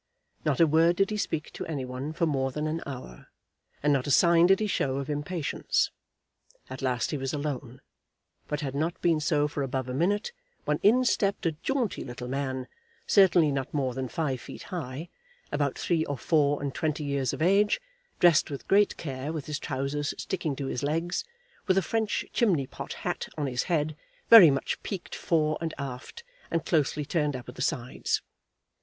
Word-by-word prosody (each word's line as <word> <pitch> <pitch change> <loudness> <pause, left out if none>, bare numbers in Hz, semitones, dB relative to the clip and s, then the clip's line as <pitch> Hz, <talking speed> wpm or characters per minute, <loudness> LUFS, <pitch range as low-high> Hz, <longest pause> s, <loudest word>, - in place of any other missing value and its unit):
Not 150 -4 +1
a 165 - +7
word 165 +3 +4
did 195 +3 +1
he 210 - -1
speak 160 -6 -2
to - - -5
any 145 -5 -3
one 130 +4 -5
for 170 +1 0
more 135 -4 0
than 150 +3 -3
an 160 +2 -2
hour, 125 - -8 0.6
and 145 0 +4
not 135 -1 0
a - - -1
sign 170 +4 +6
did 195 +1 +5
he 215 - 0
show 140 -9 0
of 140 +2 -3
impatience. 145 +2 -1 0.8
At 130 - -6
last 125 -3 0
he 150 - -2
was 135 0 -3
alone; 140 -3 -4 0.7
but 150 +1 -2
had 135 -3 -3
not 160 +5 -1
been 165 -3 +3
so 150 -2 +2
for 145 -1 -4
above 130 -1 -2
a 125 - -4
minute 200 - +1 0.3
when - - +1
in 250 +5 +5
stepped 200 -6 +1
a 165 - +3
jaunty 240 - -2
little 125 0 -7
man, 130 -1 -3 0.4
certainly 175 -6 +5
not 135 +1 -3
more 130 -3 0
than 130 +1 -3
five 135 -5 -2
feet - - -9
high, 155 -1 -5 0.4
about 140 -2 0
three 165 -3 +1
or 145 - -3
four 145 -1 +2
and 140 -2 -2
twenty 155 -1 -1
years 140 -3 0
of - - -5
age, 200 +4 +4 0.4
dressed 170 -4 +5
with 140 -2 -7
great 205 +1 +4
care, 135 -1 -4
with 155 -3 -4
his 150 0 -3
trousers 145 +1 -2
sticking 165 -6 -2
to 140 - -4
his 135 - -3
legs, 165 - -1 0.4
with 190 -1 +3
a 195 - +3
French 220 -2 -1
chimney 185 - +2
pot - - -7
hat - - -3
on 150 - -1
his 125 -2 -1
head, 155 -2 +1 0.4
very 215 -8 +11
much 140 -1 -1
peaked 190 -4 -6
fore 155 -2 +1
and 165 -1 -3
aft 140 - -7 0.3
and 165 -1 -1
closely 150 -2 +1
turned 150 -2 0
up 125 - -7
at - - -8
the - - -8
sides. 125 -1 -1
150 Hz, 195 wpm, -28 LUFS, 135-170 Hz, 0.8 s, very